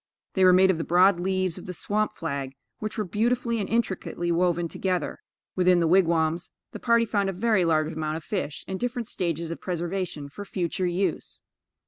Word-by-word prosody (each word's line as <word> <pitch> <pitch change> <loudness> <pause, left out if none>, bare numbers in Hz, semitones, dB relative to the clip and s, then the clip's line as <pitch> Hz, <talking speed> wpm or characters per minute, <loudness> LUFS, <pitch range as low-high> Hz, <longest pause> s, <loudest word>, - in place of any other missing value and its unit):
They 190 - +2
were 185 - +8
made 190 +1 +6
of 170 - -3
the - - -1
broad 180 +2 +4
leaves 185 -1 -1
of - - -11
the 180 - -4
swamp 210 +4 -1
flag, 140 -4 -4 0.2
which 215 +1 -5
were 215 - 0
beautifully 235 +4 0
and 200 - -3
intricately 190 -6 -1
woven 175 0 +1
together. 180 +1 -2 0.4
Within 180 -1 +4
the 170 - +2
wigwams, 170 -1 +2 0.2
the - - -7
party 235 -1 +3
found 200 -3 0
a - - -2
very 205 0 +2
large 155 -1 +1
amount 155 0 -2
of 160 - -9
fish 180 -7 -4
in 190 0 -4
different 245 -2 -2
stages 170 -2 -2
of 165 - -6
preservation 175 -4 -3
for 145 +9 -8
future 185 -2 -2
use. 175 -1 -2
180 Hz, 190 wpm, -26 LUFS, 165-200 Hz, 0.4 s, were